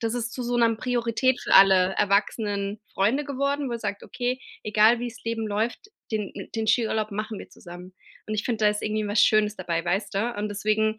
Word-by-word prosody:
das 225 +1 -1
ist 235 -1 -3
zu 255 - -5
so 245 0 -1
'ner 230 -1 +3
Priorität 245 +1 0
für - - 0
alle 190 -1 +6
erwachsenen 200 0 0
Freunde 230 +10 +1
geworden, 280 0 -1
wo 235 - -2
sagt: 205 -3 -4
„Okay, 250 +1 -3 0.2
egal 215 +2 +4
wie's 240 -1 -6
Leben 230 -1 -2
läuft, 220 - -2 0.2
den 210 -3 -2
mi - - -8
den 225 -1 -1
Skiurlaub 220 -1 +1
machen 215 +1 -4
wir - - -10
zusammen.“ 180 +1 -12 0.3
Und 215 - -3
ich 215 - -2
find, 230 -3 -2
da 210 - +5
ist 210 0 -2
irgendwie 215 0 -1
was 205 +1 +2
Schönes 215 -1 +3
dabei, 170 -2 -2
weißt 195 +4 -1
du? 225 +5 0
Und 210 +1 -2
deswegen 215 +1 0
215 Hz, 210 wpm, -25 LUFS, 205-235 Hz, 0.3 s, alle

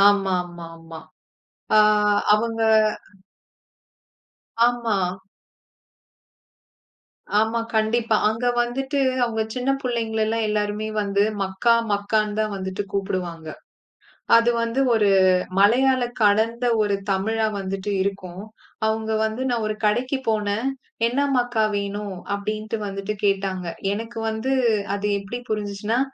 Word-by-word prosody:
ஆ - - +6
ஆமாமாமா. 175 -4 -1 0.8
ஆ - - +7 0.6
அவங்க 225 +1 -1 2.1
ஆமா. 240 -3 0 2.4
ஆமா, 220 +2 +1 0.2
கண்டிப்பா. 220 +1 +2
அங்க 225 +3 -3 0.2
வந்துட்டு 270 +4 -2 0.2
அவங்க 225 -2 -1
சின்ன 250 +1 -1
புள்ளைங்களலா 225 -3 -1
எல்லாருமே 210 0 -1
வந்து 200 0 0 0.2
மக்கா 195 +5 +2 0.2
மக்கான்னு 210 +1 0
தான் 215 -1 0
வந்துட்டு 190 +1 -4
கூப்புடுவாங்க. 180 -4 -3 0.9
அது 230 +1 +5
வந்து 230 +3 -1
ஒரு 210 -3 +3 0.5
மலையாள 250 +6 +4 0.2
கலந்த 225 +3 +2 0.2
ஒரு 205 -1 +1
தமிழா 220 +3 +1
வந்துட்டு 195 +1 -4
இருக்கும். 190 -1 -5 0.4
அவங்க 220 0 -1
வந்து 220 +3 -3
நான் 235 -2 0
ஒரு 215 - -2
கடைக்கு 245 +6 +1
போனேன். 215 +2 0 0.4
"என்ன 245 +4 -1 0.2
மக்கா 245 -2 +1
வேணும்" 200 -1 -3 0.2
அப்டின்ட்டு 215 +2 -4
வந்துட்டு 195 +1 -4
கேட்டாங்க. 195 -2 0 0.3
எனக்கு 225 +3 -5
வந்து 220 +4 -2 0.4
அது 205 +1 -2
எப்டி 200 +5 -6
புரிஞ்சுச்சுன்னா, 210 +2 -1
215 Hz, 105 wpm, -23 LUFS, 200-230 Hz, 2.4 s, ஆ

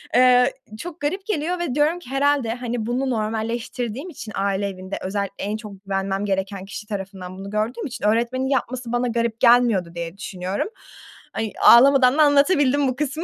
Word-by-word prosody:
Eee, 250 +1 +5 0.3
çok 350 +2 -7
garip 375 +7 -2
geliyor 355 -2 -1
ve 315 -8 -2
diyorum 305 +4 +2
ki 300 - -14
herhâlde, 275 -3 +1
hani, 240 -2 -4
bunu 255 +3 -1
normalleştirdiğim 230 - -3
için 225 -9 -9
aile 200 0 0
evinde, 190 0 -6
özellikle 200 0 -3
en 210 +1 -2
çok 205 -3 -11
güvenmem 195 +1 -2
gereken 195 -1 -2
kişi 205 +2 -8
tarafından 190 -3 -6
bunu 195 +1 -7
gördüğüm 215 +3 -2
için 245 -4 -5
öğretmenin 240 +5 +1
yapması 255 -2 -2
bana 245 +1 0
garip 235 -1 -1
gelmiyordu 235 -8 +4
diye 170 +2 -5
düşünüyorum. 190 - -3 0.7
Ay, 220 -2 -2
ağlamadan 260 +2 +7
da 310 - +5
anlatabildim 285 -1 +3
bu 255 - -1
kısmı. 300 +3 -3
235 Hz, 170 wpm, -22 LUFS, 200-270 Hz, 0.7 s, ağlamadan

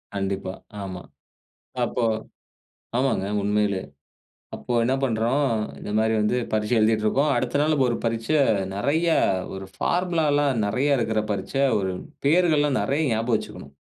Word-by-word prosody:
கண்டிப்பா. 95 -1 -2 0.3
ஆமா. 95 -2 -6 0.8
அப்போ 120 +1 -2 0.9
ஆமாங்க. 130 -7 +1 0.2
உண்மையிலே 105 -2 +1 0.7
அப்ப 120 - -4
என்ன 125 +3 +1
பண்றோம், 125 +3 +1 0.3
இந்த - - -7
மாரி 110 0 +2
வந்து, 105 +3 +1
பரீட்சை 110 +2 0
எழுதிட்டிருக்கோம். 110 +7 +2
அடுத்த 130 - 0
நாள் 155 +1 +2
இப்ப 135 -3 +2
ஒரு 120 - 0
பரீட்சை, 115 +5 0 0.4
நெறயா 160 +10 +1 0.4
ஒரு 95 0 -7
பார்முலாலாம் 150 -8 +1
நெறயா 130 +8 +1
இருக்குற 110 -2 0
பரீட்சை. 100 +8 -1 0.2
ஒரு 95 -1 -1 0.3
பெயர்கள்லாம் 150 -3 +3
நெறயா 145 +2 0
ஞாபகம் 115 +1 +1
வச்சுக்கணும். - - -9
115 Hz, 125 wpm, -24 LUFS, 105-145 Hz, 0.9 s, பெயர்கள்லாம்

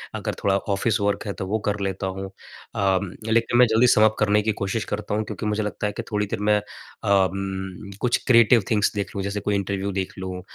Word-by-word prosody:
अगर - - -3
थोड़ा 100 -1 +3
office 100 +2 0
work 100 0 0
है 100 - -2
तो 95 - -5
वो 110 +3 0
कर 105 0 0
लेता 95 -1 -2
हूँ। 95 +1 -5
उम, 95 -1 -3 0.2
लेकिन 115 +1 +2
मैं 125 - +8
जल्दी 115 +3 +4
समाप्त 110 -1 +5
करने 105 0 +3
की 110 +1 0
कोशिश 100 +3 -1
करता 105 0 -4
हूँ 110 - 0
क्योंकि 105 - -6
मुझे 105 0 0
लगता 105 0 -2
है 105 - -3
कि - - -5
थोड़ी 105 0 +1
देर - - -3
मैं 105 0 +3
उम, 95 -1 -2
कुछ 125 -1 +2
क्रिएटिव 115 -2 +6
थिंग्स 105 -2 +3
देख 100 -1 -3
लूँ। 100 - -2
जैसे 100 +1 -2
कोई 100 0 -1
इंटरव्यू 100 0 -2
देख 95 -1 -3
लूँ, 95 -1 -5
100 Hz, 220 wpm, -24 LUFS, 95-105 Hz, 0.2 s, मैं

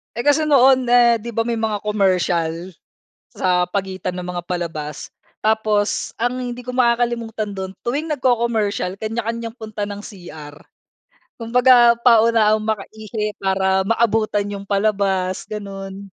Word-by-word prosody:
Eh 235 - -3
kasi 300 +2 +3
noon 260 -3 +5
eh, 240 -1 +5
'di 235 +2 -7
ba 230 - +1
may 230 0 -2
mga 215 -2 -2
commercial 185 -5 +1 0.8
sa 180 -1 0
pagitan 190 -1 -3
ng 180 -1 -5
mga 180 -1 -4
palabas. 160 -4 -5 0.3
Tapos 215 -1 0
ang 245 +2 -1
hindi 245 0 -6
ko 250 - -5
makakalimutan 235 -3 0
dun, 190 -1 -5 0.2
tuwing 290 +7 -2
nagco-commercial, 230 -8 0
kanya-kanyang 230 +1 -4
punta 215 -3 -5
ng 205 0 -7
CR. 155 -8 -11 0.8
Kumbaga, 240 0 +4
paunahan 225 -2 +4
makaihi 215 0 -4
para 190 0 +1
maabutan 215 0 +1
yung 200 0 -8
palabas. 195 -2 0
Gano'n. 195 -2 -7
215 Hz, 125 wpm, -20 LUFS, 195-235 Hz, 0.8 s, noon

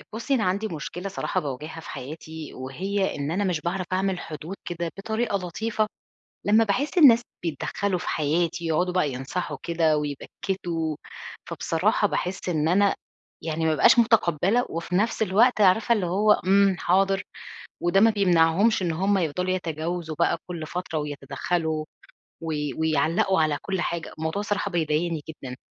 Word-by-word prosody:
أ - - -13
بُصّي 235 +5 -1
أنا 230 -6 +1
عندي 200 +4 0
مشكلة 175 +3 -5
صراحة 190 -1 -2
باواجهها 150 +2 -6
في - - -10
حياتي، 155 +2 -8
وهي 190 +10 -2
إن 145 +1 -3
أنا 195 +5 0
مش 180 -5 0
باعرَف 180 +3 -2
أعمل 190 0 0
حدود 160 +4 -7
كده 170 -1 -3
بطريقة 220 +1 -1
لطيفة 215 +5 -1 0.6
لمّا 215 +2 +5
باحس 255 - 0
الناس 240 -7 +8 0.2
بيتدخّلوا 180 +4 -2
في - - -5
حياتي، 165 +3 0
يقعُدوا 175 +3 +1
بقى 165 -6 +1
ينصَحوا 135 +8 -4
كده 165 -2 +2
ويبكّتوا، 160 +2 -3 0.5
فبصراحة - - +1
باحس 185 +1 -3
إن 155 -3 +1
أنا 200 +3 +4 0.5
يعني 160 0 -2
ما 160 - +3
أبقاش 155 - +5
متقبِّلة 225 -1 +3
وفي 170 +2 -4
نَفْس 220 +3 +1
الوقت 220 +4 +3
عارفة 210 +5 +5
اللي 195 -5 0
هو 205 +5 +4
امم، 195 -1 +3
حاضر 195 +2 +2 0.6
وده 175 +3 +4
ما 225 +2 +6
بيمنعهمش 190 +1 +3
إن 175 -2 0
هُم 195 +5 +1
يفضَلوا 180 +1 -1
يتجاوزوا 165 -2 -3
بقى 170 0 +3
كلّ 170 -3 -5
فترة 175 -1 -4
ويتدخّلوا 155 +2 -2 0.6
وي 150 -4 -3
ويعلّقوا 160 +3 +2
على 150 -2 +1
كلّ 190 -2 -2
حاجة، 170 -2 -3
الموضوع 160 +5 -2
الصراحة 205 -1 -1
بيضايقني 165 -1 0
جدًا، 135 -5 -8
175 Hz, 155 wpm, -25 LUFS, 160-195 Hz, 0.6 s, الناس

